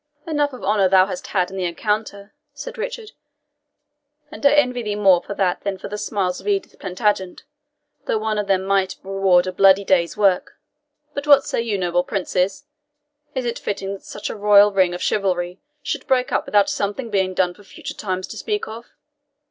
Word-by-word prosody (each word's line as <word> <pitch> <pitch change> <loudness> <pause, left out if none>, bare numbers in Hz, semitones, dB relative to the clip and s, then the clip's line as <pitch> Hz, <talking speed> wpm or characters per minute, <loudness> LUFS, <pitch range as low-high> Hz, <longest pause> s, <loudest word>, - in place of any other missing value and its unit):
"Enough 295 -3 0
of 255 - -10
honour 195 -1 +3
thou 185 0 +6
hast 190 -2 -6
had 185 -2 0
in 195 - -7
the 185 - -1
encounter," 200 +3 -3 0.2
said 285 0 -7
Richard, 470 -1 -5 1.2
"and 310 - -10
I 280 - +6
envy 250 -4 +2
thee 210 -2 -3
more 190 -4 +4
for 200 - -7
that 185 -3 0
than 200 -1 -3
for 185 - -8
the 210 - -4
smiles 190 -5 -2
of - - -11
Edith 395 -1 -1
Plantagenet, 190 -1 -1 0.6
though - - +1
one 215 -1 -1
of 205 - -2
them 190 -1 +2
might 195 -1 +1
reward 190 -2 +3
a 185 - -2
bloody 195 +1 +5
day's 175 -2 +1
work. 195 -3 +2 0.6
But 285 +1 -5
what 285 -1 +7
say - - -1
you, 225 -3 -1
noble 175 -1 +1
princes? 195 +6 -1 0.7
Is 260 -1 -2
it 235 0 -2
fitting 195 -1 -3
that 195 - -10
such 205 - -6
a - - -6
royal 205 0 +6
ring 185 -3 +2
of 175 - -5
chivalry 180 -2 -1 0.2
should 290 - -4
break 255 -1 +1
up - - 0
without 205 -1 +4
something 210 +4 -3
being 190 -2 0
done 180 -1 +1
for 205 - -18
future 195 - -8
times 185 -2 -3
to - - -8
speak 420 -1 -2
of? 230 +2 -9
200 Hz, 195 wpm, -21 LUFS, 185-225 Hz, 1.2 s, what